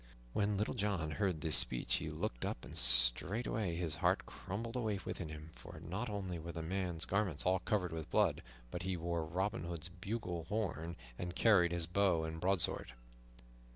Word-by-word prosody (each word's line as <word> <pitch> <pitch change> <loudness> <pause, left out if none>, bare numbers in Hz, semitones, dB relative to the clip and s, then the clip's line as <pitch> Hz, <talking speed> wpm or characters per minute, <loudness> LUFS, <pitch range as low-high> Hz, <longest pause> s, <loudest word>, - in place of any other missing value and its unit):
When 105 0 +1
Little 105 - 0
John 100 -9 -1
heard 90 -2 0
this 80 -3 +5
speech 60 - +5
he - - -4
looked - - -3
up, - - -3
and - - -10
straightway 85 - +2
his 85 -4 -2
heart - - +2
crumbled 115 +5 -5
away 110 -5 0
within 85 -4 -4
him, 75 0 -8
for - - -11
not 100 +8 -4
only 95 -4 -3
were 85 +1 -6
the 85 -1 -5
man's 90 -1 -1
garments 95 -6 0
all 95 +1 +3
covered 90 -1 0
with 80 -2 -5
blood, - - +3 0.3
but 90 - -4
he 95 0 -1
wore 85 0 -1
Robin 95 +7 -2
Hood's 85 0 -4
bugle 90 -2 -4
horn 85 -4 -2 0.2
and 90 0 -4
carried 95 -7 +5
his 85 -1 0
bow 90 -1 +2
and 80 0 -4
broadsword. 90 -9 +2
90 Hz, 180 wpm, -36 LUFS, 80-100 Hz, 0.3 s, this